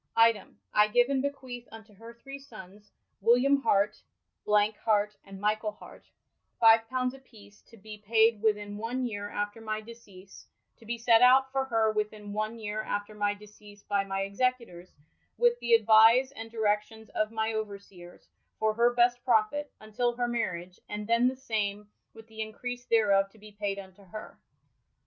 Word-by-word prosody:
''' - - -51 0.2
Item, 210 -4 -13
I 210 0 +5
f^yve 245 +4 +3
and 270 -2 +1
be 280 - +1
queath 250 -3 -10
unto 220 -1 -13
her 230 +4 -12
three 275 +4 -10
sonnes, 205 -5 -14 0.3
William 255 +6 +4
Harte, 210 -7 +1 0.5
Hart, 210 0 +2
and 195 -1 -11
Michaell 215 +1 -1
Harte, - - -15 0.5
fyve 225 -1 +6
pounds 255 +1 -1
a 270 - -12
peece, 205 -6 -18
to 230 - -17
be 210 +1 -11
paied 220 +1 +3
within 210 -2 0
one 245 +4 -3
yeare 205 -3 -5
after 205 +2 -4
my 215 -1 -3
deceas 210 -4 -14 0.3
[to 225 - -18
be 235 +1 -3
sett 230 0 +4
out 260 +1 +6
for 270 0 0
her 225 -3 +1
within 210 -1 -4
one 215 +2 -3
yeare 215 -1 -4
after 205 0 -4
my 205 -1 -1
deceas 205 0 -16
by 200 -1 0
my 195 0 -3
execu 245 +5 0
tours, 175 -2 -14 0.5
with 480 0 +3
thadvise 230 +3 +5
and 225 0 -8
direccions 220 0 -2
of 215 0 -1
my 220 0 -1
overseers, 200 -5 -8 0.3
for 220 0 +1
her 235 +2 +3
best 245 0 +3
profitt, 255 +5 +1
untill 235 +3 -2
her 245 -1 0
mariage, 185 -7 -3
and 210 0 -5
then 235 +2 +3
the 260 - -1
same 210 -5 -3 0.3
with 225 0 -13
the 220 -1 -8
increase 245 +3 -6
thereof 200 -3 +3
to 220 - -22
be 210 0 -14
paied 205 -1 -3
unto 195 0 -12
her]. 215 +4 -10
220 Hz, 175 wpm, -29 LUFS, 205-235 Hz, 0.5 s, fyve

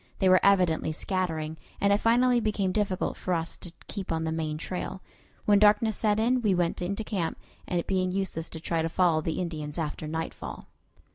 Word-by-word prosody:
They 190 - +3
were 185 0 +7
evidently 180 -5 +3
scattering, 160 -3 -2 0.2
and 200 0 +3
it 200 - +3
finally 245 +2 +4
became 210 -4 0
difficult 200 -2 -1
for 185 - -1
us 165 0 -3
to 175 - -9 0.2
keep 195 -4 -5
on 160 0 0
the 160 - -1
main 155 -1 -2
trail. 180 +3 -5 0.4
When 205 -1 +5
darkness 210 +1 +4
set 210 -1 +1
in 245 +3 +2
we 205 -5 +2
went 175 -1 0
into 195 +5 -2
camp, 190 -6 -2 0.3
it 175 -1 -1
being 185 -1 0
useless 185 -4 -2
to 160 - -7
try 165 0 -1
to 165 - -1
follow 165 -2 +3
the 160 0 -2
Indians 155 -4 -4
after 155 -1 -3
nightfall. 160 +1 -5
185 Hz, 195 wpm, -28 LUFS, 160-205 Hz, 0.4 s, were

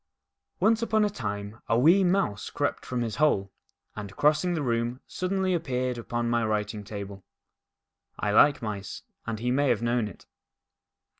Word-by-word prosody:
ONCE 225 +1 +3
upon 220 -2 +2
a 205 - -1
time 105 - -5
a 115 - +2
wee 170 +10 +6
Mouse 180 - +1
crept - - -2
from 125 -1 -2
his 115 -2 -4
hole, 100 -11 +2 0.4
and, 100 -1 -7
crossing 155 +4 +2
the 155 - -1
room, 120 0 -1
suddenly 185 0 -1
appeared 130 -7 -1
upon 120 0 -2
my 120 0 +1
writing 105 -1 -1
table. 100 -1 -7 0.9
I 105 - -1
like 140 +5 +5
mice, 105 -2 -5 0.2
and 115 -1 -2
he 120 +3 -1
may 140 +2 +2
have 120 -2 +1
known 120 -2 +1
it. 100 - -12
120 Hz, 160 wpm, -27 LUFS, 105-155 Hz, 0.9 s, wee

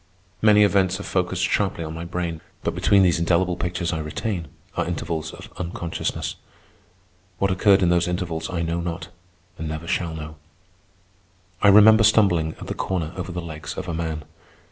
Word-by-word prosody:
Many 105 -1 +6
events 95 -2 +2
are - - -5
focussed 90 -2 -1
sharply 85 - 0
on 80 0 -5
my 80 +1 -6
brain, 85 -2 -3 0.2
but - - -1
between 100 -1 +4
these 85 -3 +3
indelible 90 +1 +2
pictures 90 -1 -2
I 80 - -2
retain 85 +3 -3 0.3
are - - -1
intervals 80 -2 -3
of - - -12
unconsciousness. 85 -1 -3 1.0
What 100 +1 +1
occurred 95 +1 +4
in 90 - +4
those 85 0 +2
intervals 85 -3 -3
I 85 -2 -2
know 85 +1 -1
not, 85 0 -5 0.5
and 80 - -3
never 80 +2 -5
shall 85 -1 -1
know. 75 0 -8 1.2
I - - +5
remember 110 +2 +8
stumbling 95 -7 +3
at - - -7
the - - -3
corner 85 -3 -2
over 90 0 -5
the 90 0 -4
legs 80 -3 -7
of 95 - -4
a 85 - -3
man. 80 -2 -3
85 Hz, 175 wpm, -23 LUFS, 80-95 Hz, 1.2 s, remember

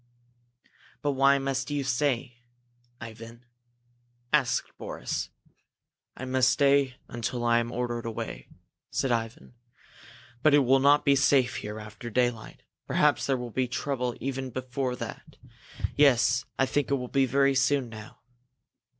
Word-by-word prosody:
"But 145 - +2
why 140 +1 +4
must 135 -1 -2
you 145 -1 -1
stay, 125 -2 -1 0.6
Ivan?" 115 +1 -10 0.9
asked 140 -5 +1
Boris. - - -4 0.9
"I 130 - -5
must 130 0 +3
stay 140 -2 +3
until 120 +1 -3
I 120 0 +4
am 120 0 -3
ordered 120 -1 -3
away," 115 - -6 0.4
said 135 - -1
Ivan. 115 +1 -3 0.9
"But 155 0 +5
it 145 -2 +4
will 135 +2 +5
not 145 +2 +4
be 140 -1 +5
safe 135 -2 +3
here 105 +1 -6
after 105 +2 -9
daylight 120 -1 -1 0.2
perhaps 150 -1 +2
there 135 -1 +1
will 125 -1 -6
be 130 +2 0
trouble 125 -1 -2
even 135 +1 -3
before 130 +1 -3
that. - - -8 0.6
Yes, 130 -2 +4
I 135 - +3
think 145 +1 -1
it 140 - +2
will 125 -2 -4
be 135 +1 +2
very 140 +2 +3
soon 135 0 +2
now." 110 -1 -11
130 Hz, 140 wpm, -27 LUFS, 120-140 Hz, 0.9 s, But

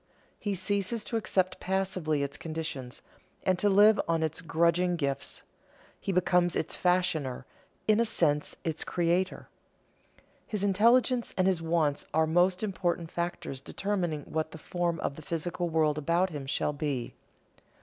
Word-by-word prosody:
He 205 -2 -2
ceases 200 +4 -1
to 235 - -4
accept 185 -3 0
passively 185 -6 0
its 140 - -3
conditions, 155 -6 -5 0.4
and 185 -1 +1
to 205 - +3
live 205 +2 +6
on 165 -1 +1
its 160 +2 -2
grudging 170 +2 +2
gifts; 140 -4 -2 0.6
he - - -2
becomes 180 -1 +2
its - - 0
fashioner, 175 -8 0 0.4
in 215 0 +4
a - - +5
sense 150 -9 +1
its 160 -1 -2
creator. 175 +2 0 1.0
His 210 -2 -2
intelligence 235 +5 +3
and 185 - +3
his 185 -3 +2
wants 160 -3 0
are 160 0 +4
most 180 +4 +2
important 175 -4 -1
factors 170 -5 -4
determining 175 -2 -2
what 160 0 -2
the - - -7
form 170 +1 -2
of 140 - -3
the - - -8
physical 170 +2 -2
world 155 -2 +2
about 170 +5 +1
him 145 -3 -6
shall 150 - 0
be. 140 -4 -3
170 Hz, 150 wpm, -29 LUFS, 155-190 Hz, 1.0 s, live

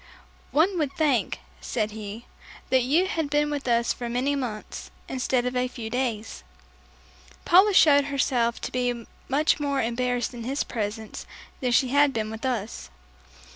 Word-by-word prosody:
"One 345 +5 +2
would 290 -3 -1
think," 290 -7 +1 0.2
said 215 -3 -2
he, 215 +2 -7 0.5
"that 260 -1 +5
you 295 +9 +3
had 320 -5 -2
been 295 +1 +1
with 285 -2 -3
us 235 0 +2
for 240 -1 -5
many 255 +4 0
months 235 -6 -5 0.2
instead 255 -1 0
of 250 0 -2
a 250 0 +1
few 230 -3 -7
days." 235 - -2 1.0
Paula 380 +4 +6
showed 285 -4 +6
herself 255 -4 0
to - - -4
be 245 -2 -1 0.2
much 295 +4 +2
more 280 -2 0
embarrassed 245 +1 -1
in 235 -1 -7
his 270 +4 -1
presence 220 -1 -5 0.3
than 250 -3 0
she 250 +1 +3
had 285 +1 +4
been 215 -2 -2
with 220 +4 -4
us. 220 - -3
250 Hz, 160 wpm, -26 LUFS, 235-285 Hz, 1.0 s, Paula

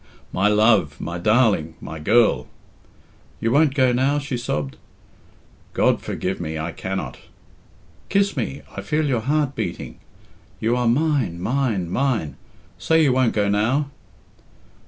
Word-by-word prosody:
"My 95 +3 +2
love! 105 -8 +3
My 85 0 -4
darling! 105 -6 +2
My 80 - -8
girl!" 100 - +3 0.9
"You 115 - 0
won't 145 +1 +3
go 130 -3 +4
now?" 135 +4 +2
she 140 -2 -3
sobbed. 75 - -3 1.0
"God - - +2
forgive 95 0 -3
me, 80 -2 -4
I 80 - -3
cannot." 95 0 -5 0.9
"Kiss 200 0 +2
me. 135 - -4
I - - -4
feel 155 0 0
your 130 -5 0
heart 145 +2 0
beating. - - -5 0.6
You 115 +2 +1
are 125 -1 0
mine 130 - +1
mine 110 -4 -1
mine! 115 - 0 0.4
Say 160 0 +3
you 135 -4 +3
won't 130 -2 +2
go 105 -1 +1
now!" 120 +8 +1
120 Hz, 135 wpm, -22 LUFS, 95-140 Hz, 1.0 s, go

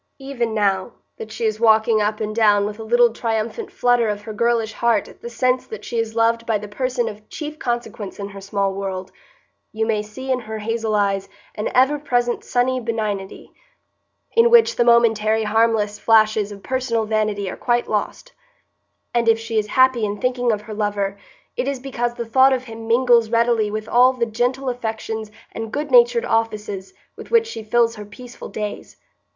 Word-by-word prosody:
Even 245 -5 -3
now, 200 0 0 0.2
that 220 0 -8
she 225 +1 -3
is 215 -1 -1
walking 220 -1 +4
up 210 +1 -1
and 215 -1 -3
down 205 -3 +4
with 210 +1 -5
a - - -5
little 240 +1 +3
triumphant 230 - -3
flutter 245 -2 +2
of 205 0 -4
her 220 0 -7
girlish 230 0 0
heart 235 0 +1
at - - -16
the 235 - -6
sense 255 +2 0
that 215 -1 -8
she 235 - -2
is 225 -1 -3
loved 230 0 +2
by 225 -2 +2
the 210 0 -8
person 250 +3 -2
of 215 0 -9
chief 305 0 -7
consequence 230 -4 -4
in 200 0 -6
her 200 -1 -10
small 195 0 -1
world, 190 -1 -5 0.6
you 220 +1 -1
may 220 -2 0
see 235 +6 -6
in 255 - +1
her 220 -2 -6
hazel 220 0 -2
eyes 200 -1 0 0.2
an 210 - -3
ever 265 +4 +4
present 245 -4 -1
sunny 255 +1 0
benignity, 215 -5 -4 0.8
in 465 +1 +5
which 470 -1 +5
the 240 - +3
momentary 225 -2 +3
harmless 215 -1 +1
flashes 215 -2 +3
of 200 -1 -10
personal 250 -4 -1
vanity 215 -2 -1
are - - -4
quite 240 -1 0
lost; 215 - -3 0.8
and 235 -1 +2
if 225 - +5
she 225 0 -2
is 210 - -3
happy 260 0 +3
in 205 0 -1
thinking 245 0 0
of 210 -1 -2
her 215 +1 -9
lover, 205 -2 -1 0.4
it 250 - -2
is 280 -2 -2
because 240 -2 -3
the 235 - -4
thought 260 +4 +4
of 255 -1 -1
him 225 -2 -9
mingles 235 -1 +4
readily 230 -2 +2
with 215 +1 -4
all 250 +2 +5
the 240 -2 -1
gentle 245 +4 -1
affections 220 -3 -4 0.2
and 225 -1 -6
good 290 +1 -3
natured 240 -1 +5
offices 210 -4 -2 0.2
with - - -11
which 460 -1 +4
she 450 - -7
fills 230 +1 +1
her 210 - -7
peaceful 240 +4 -11
days. 210 -1 -6
225 Hz, 190 wpm, -21 LUFS, 210-240 Hz, 0.8 s, in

